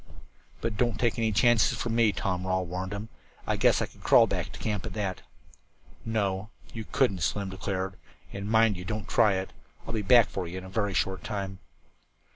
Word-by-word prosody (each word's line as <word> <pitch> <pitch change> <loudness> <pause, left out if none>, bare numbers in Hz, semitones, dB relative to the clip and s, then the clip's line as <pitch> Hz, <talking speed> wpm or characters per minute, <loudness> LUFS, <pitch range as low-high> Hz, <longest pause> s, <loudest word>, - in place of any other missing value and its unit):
"But 115 -3 -2
don't 120 0 +1
take 120 0 +1
any 110 -1 +1
chances 115 +1 +4
for 120 - -3
me," 115 -1 +3
Tom 95 -2 -2
Rawle 95 0 0
warned 90 +2 -4
him. 105 +2 -5 0.4
"I - - 0
guess - - +3
I - - -1
could - - -17
crawl - - +6
back - - -3
to - - -9
camp, 105 -3 -2
at - - -7
that." 100 -4 -3 0.8
"No, 105 -2 -1 0.2
you 110 -2 -6
couldn't," 110 -9 +2
Slim 100 +5 -1
declared, 95 0 -3 0.4
"and 100 +1 -5
mind 110 -3 +4
you 90 - -6
don't 105 +2 -4
try 110 -4 +4
it. 95 0 -4 0.3
I'll - - -5
be 110 - 0
back 115 +2 +6
for 95 -2 -3
you 90 +2 -6
in 95 - -6
a - - -9
very 100 -1 -1
short 95 0 0
time." 95 -2 -4
100 Hz, 205 wpm, -28 LUFS, 95-110 Hz, 0.8 s, crawl